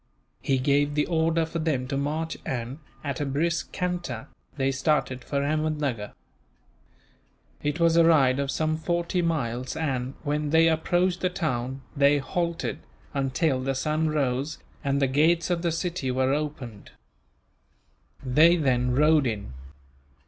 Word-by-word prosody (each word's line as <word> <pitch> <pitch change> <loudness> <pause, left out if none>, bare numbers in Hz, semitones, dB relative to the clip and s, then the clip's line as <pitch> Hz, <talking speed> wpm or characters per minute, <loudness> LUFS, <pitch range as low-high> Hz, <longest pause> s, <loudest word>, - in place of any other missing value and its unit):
He 135 - +1
gave 145 +2 +2
the 150 - +2
order 165 -1 +1
for 165 +1 -4
them 145 -6 -1
to 140 - -1
march 155 +4 -2
and, 125 +3 -4 0.2
at 140 -1 -3
a - - +1
brisk 160 +5 -1
canter, 175 -10 -3 0.3
they 135 -1 +1
started 130 -2 0
for 140 +2 -1
Ahmednuggur. 150 -7 -1 1.5
It 150 +3 -2
was 165 -1 +4
a 170 - +6
ride 140 -5 +4
of 140 -1 -1
some 155 +2 0
forty 170 +2 -1
miles 130 -7 -2
and, 135 -4 -2
when 150 0 -1
they 160 +2 +5
approached 175 +3 +1
the 185 - +2
town, 135 -7 -3
they 140 0 +4
halted 170 +4 -2 0.3
until 135 0 0
the 135 +1 -1
sun 155 +3 0
rose 140 -1 -1 0.3
and 140 -1 +1
the 140 - +3
gates 165 +6 +2
of 170 -1 0
the 170 -1 0
city 165 -4 -2
were 130 +1 +1
opened. 140 -8 -5 1.3
They 155 +7 +5
then 125 -4 +1
rode 150 -1 +4
in. 105 - -4
145 Hz, 145 wpm, -26 LUFS, 130-165 Hz, 1.5 s, a